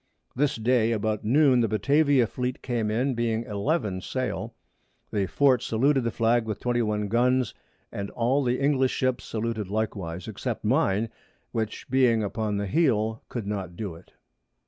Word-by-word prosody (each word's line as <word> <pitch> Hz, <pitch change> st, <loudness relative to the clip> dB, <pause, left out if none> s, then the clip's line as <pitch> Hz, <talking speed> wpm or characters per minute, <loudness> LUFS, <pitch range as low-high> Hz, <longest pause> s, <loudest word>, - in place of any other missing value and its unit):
This 145 Hz, +1 st, +1 dB
Day 115 Hz, 0 st, +2 dB
about 110 Hz, 0 st, -1 dB
Noon 130 Hz, +3 st, +4 dB
the 115 Hz, -, +3 dB
Batavia 140 Hz, +4 st, +3 dB
Fleet 125 Hz, +2 st, -4 dB
came 120 Hz, -4 st, -1 dB
in, 125 Hz, +5 st, +1 dB
being 115 Hz, -1 st, -1 dB
11 105 Hz, -, -1 dB
Sail. 130 Hz, +6 st, -3 dB, 0.6 s
The 100 Hz, -2 st, 0 dB
Fort 130 Hz, -1 st, +3 dB
saluted 135 Hz, +4 st, +2 dB
the 115 Hz, -, 0 dB
Flag 115 Hz, +1 st, +2 dB
with 110 Hz, -2 st, -4 dB
21 110 Hz, -4 st, 0 dB
Guns, 125 Hz, +2 st, +2 dB, 0.4 s
and 100 Hz, 0 st, -4 dB
all 125 Hz, +4 st, +1 dB
the 125 Hz, 0 st, 0 dB
English 135 Hz, -2 st, +2 dB
Ships 130 Hz, -1 st, 0 dB
saluted 110 Hz, -3 st, -3 dB
likewise, 95 Hz, -5 st, -3 dB
except 110 Hz, +2 st, -4 dB
mine, 110 Hz, -4 st, +2 dB, 0.4 s
which 110 Hz, -1 st, -3 dB
being 125 Hz, -4 st, +3 dB
upon 105 Hz, 0 st, -2 dB
the 100 Hz, -, -1 dB
Heel, 110 Hz, -, +1 dB
could 120 Hz, -4 st, -4 dB
not 95 Hz, -4 st, -4 dB
do 100 Hz, -6 st, -4 dB
it. 85 Hz, +2 st, -16 dB
115 Hz, 155 wpm, -26 LUFS, 105-130 Hz, 0.6 s, Noon